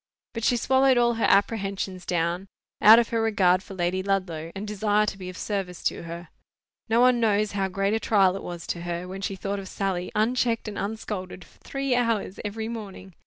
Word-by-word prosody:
But 230 - -5
she 245 - +3
swallowed 265 +2 +3
all 240 0 +3
her 225 - 0
apprehensions 195 -3 0
down, 175 +2 -1 0.3
out 220 +2 +10
of 235 -1 +2
her 230 -1 0
regard 190 -5 +3
for 195 - -10
Lady 180 +1 0
Ludlow, 185 -5 -2
and 200 +2 -5
desire 210 0 +1
to 200 - -3
be 185 -2 -7
of 185 - -9
service 195 -4 -4
to - - -1
her. 170 +1 -8 0.6
No 225 +1 +3
one 250 0 +5
knows 215 -2 +2
how 195 -1 -1
great 195 +2 -1
a 225 - +1
trial 195 -4 +3
it 195 - -5
was 175 -1 -7
to 170 - -4
her 175 +1 -4
when 190 +1 -7
she 195 0 -3
thought 200 +1 -3
of 195 - -8
Sally, 185 -2 -2
unchecked 230 +1 +1
and 210 - -5
unscolded 200 -3 -5
for - - -24
three 275 -1 -2
hours 230 -6 0
every 220 +2 -4
morning. 200 -5 -8
200 Hz, 210 wpm, -26 LUFS, 185-225 Hz, 0.6 s, out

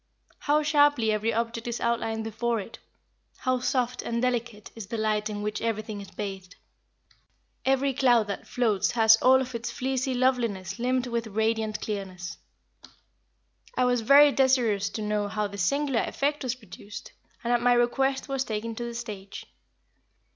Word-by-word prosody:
How 300 +1 +2
sharply 290 -6 +3
every 215 +2 0
object 230 +1 -2
is 240 0 -3
outlined 225 -1 -1
before 225 +1 -1
it? 205 +3 -9 0.6
How 255 -1 0
soft 250 -1 -1
and 235 0 -2
delicate 235 -4 -2
is 225 -4 -8
the 230 - -4
light 215 -1 0
in 205 -1 -4
which 210 0 -3
everything 215 -2 -3
is 200 - -10
bathed? 195 -2 -7 1.1
Every 270 +1 +2
cloud 245 -4 +4
that 200 -1 -6
floats 220 -6 +1
has 225 -2 +7
all 260 +3 +5
of 260 -1 -5
its 235 0 -4
fleecy 260 0 -2
loveliness 230 -8 0
limned 250 +1 +1
with 235 -2 -2
a - - -9
radiant 220 0 -1
clearness. 185 -4 -5 1.4
I - - +3
was 245 -1 +2
very 285 +5 +7
desirous 245 -7 +2
to 215 - -5
know 210 -1 0
how 210 +1 -2
this 200 -1 -5
singular 275 +4 +1
effect 290 +2 -1
was 255 -2 -2
produced, 210 -3 -11 0.3
and 240 0 +1
at 240 - +2
my 245 0 +4
request 265 +3 +1
was 270 -1 -1
taken 225 -1 -4
to 240 - -3
the 235 0 -5
stage. 210 -5 -7
235 Hz, 165 wpm, -27 LUFS, 210-255 Hz, 1.4 s, has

